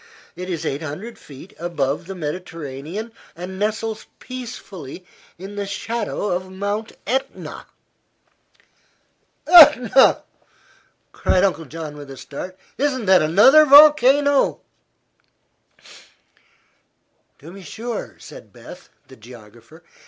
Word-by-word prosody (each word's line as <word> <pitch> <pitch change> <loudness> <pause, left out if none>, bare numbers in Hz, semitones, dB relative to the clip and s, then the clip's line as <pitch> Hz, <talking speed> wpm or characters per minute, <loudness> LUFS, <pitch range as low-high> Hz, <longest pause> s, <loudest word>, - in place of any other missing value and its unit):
It 180 +2 -7
is 170 -4 -4
eight 140 +3 -3
hundred 175 +10 -8
feet 140 +6 -14
above 165 -1 -3
the 195 - -7
Mediterranean 165 - -7 0.2
and 185 +2 -8
nestles 220 +1 -3
peacefully 200 - -9 0.3
in 195 +3 -10
the 200 -1 -3
shadow 215 0 -4
of 185 +1 -3
Mount 205 +3 -4
Etna.'" 265 +3 -4 1.8
"Etna!" 275 - +6 0.9
cried 185 - +1
Uncle 165 -5 0
John, 155 +1 -8
with 145 -1 -11
a 135 - -10
start. 185 +8 -9 0.2
"Isn't 260 -5 -1
that 190 -1 +5
another 210 - +6
volcano?" 285 -1 +5 2.8
"To 165 - -13
be 195 - -12
sure," 225 +7 -7
said - - -14
Beth, - - -14 0.2
the - - -15
geographer. 120 +6 -16
190 Hz, 105 wpm, -20 LUFS, 160-235 Hz, 2.8 s, Etna